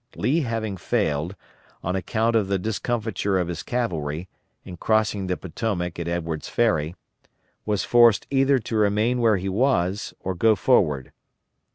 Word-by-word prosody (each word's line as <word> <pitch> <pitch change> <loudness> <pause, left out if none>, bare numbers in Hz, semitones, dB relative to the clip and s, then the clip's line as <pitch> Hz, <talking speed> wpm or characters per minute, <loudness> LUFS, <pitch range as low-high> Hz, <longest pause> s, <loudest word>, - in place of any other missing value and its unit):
Lee 150 +6 +1
having 115 - -2
failed, 80 +2 -1 0.5
on 90 +2 -1
account 110 +5 0
of 105 -4 +2
the 100 0 +1
discomfiture 110 -1 -1
of 90 -2 -1
his 85 -2 -4
cavalry, 85 -9 -2 0.4
in 90 - -8
crossing 105 -2 +1
the 90 - -1
Potomac 90 -2 -3
at 85 - -3
Edwards' 85 -2 -3
Ferry, 85 -8 +1 0.7
was 105 -2 0
forced 120 -3 +5
either 135 0 +4
to 115 -1 -4
remain 105 +4 +2
where 110 -3 +4
he 95 +1 -4
was 100 -3 0
or 95 - -3
go 110 +5 +3
forward. 75 - +2
100 Hz, 150 wpm, -24 LUFS, 90-115 Hz, 0.7 s, forced